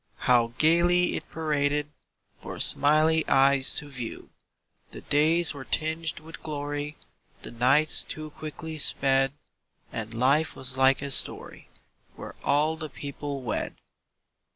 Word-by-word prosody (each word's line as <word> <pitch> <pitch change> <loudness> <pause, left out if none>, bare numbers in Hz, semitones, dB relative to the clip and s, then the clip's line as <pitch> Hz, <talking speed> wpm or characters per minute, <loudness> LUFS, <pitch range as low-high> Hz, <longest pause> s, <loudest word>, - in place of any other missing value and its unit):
How 120 -1 +3
gaily 175 +2 +3
it - - -7
paraded 150 -2 -1 0.5
For - - -8
smiling 155 +2 +4
eyes 135 0 +3
to 150 - -1
view! 125 -5 -8 0.6
The - - -10
days 160 +3 +2
were 140 -2 -8
tinged 160 +2 -2
with 160 +1 -11
glory, 145 0 -5 0.5
The - - -7
nights 135 +6 +2
too 155 0 -8
quickly 155 +1 -8
sped, 135 -1 +3 0.6
And 115 0 -5
life 140 +6 +2
was 130 0 -4
like 135 +1 +3
a 140 - -3
story - - -1 0.5
Where - - -9
all 150 +3 +1
the 155 -1 -6
people 140 0 -6
wed. 115 - -3
145 Hz, 130 wpm, -26 LUFS, 135-155 Hz, 0.6 s, smiling